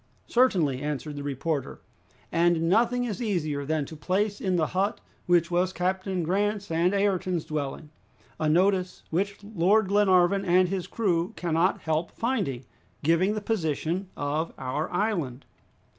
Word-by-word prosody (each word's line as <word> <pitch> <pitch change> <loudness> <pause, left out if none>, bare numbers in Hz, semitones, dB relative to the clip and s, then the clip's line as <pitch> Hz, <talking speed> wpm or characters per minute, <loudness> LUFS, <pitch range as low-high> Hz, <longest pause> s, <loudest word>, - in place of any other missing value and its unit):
"Certainly," 180 - +2
answered 150 0 -4
the 145 - -5
reporter, 140 +1 -3 0.5
"and 170 -1 +3
nothing 235 +6 +3
is 240 0 -3
easier 155 -10 -1
than 155 0 0
to 160 - -10
place 200 +6 -1
in 185 -2 0
the 165 -3 +2
hut, 195 +6 -1 0.3
which 175 -1 +3
was 180 +1 +2
Captain 185 0 -1
Grant's 200 +3 -1
and 170 +2 +2
Ayrton's 185 -4 0
dwelling, 150 0 -4 0.5
a 155 - +1
notice 185 +2 +2
which 200 +5 -1
Lord 205 0 +2
Glenarvan 195 -1 +4
and 180 -1 +3
his 190 -2 -3
crew 180 -6 0
cannot 170 +2 +1
help 160 +1 -1
finding, 200 - -2 0.4
giving 170 +7 +3
the 215 - -3
position 180 -2 -1
of 150 +3 -2
our 135 +4 -3
island." 175 - -1
180 Hz, 145 wpm, -27 LUFS, 155-200 Hz, 0.5 s, Glenarvan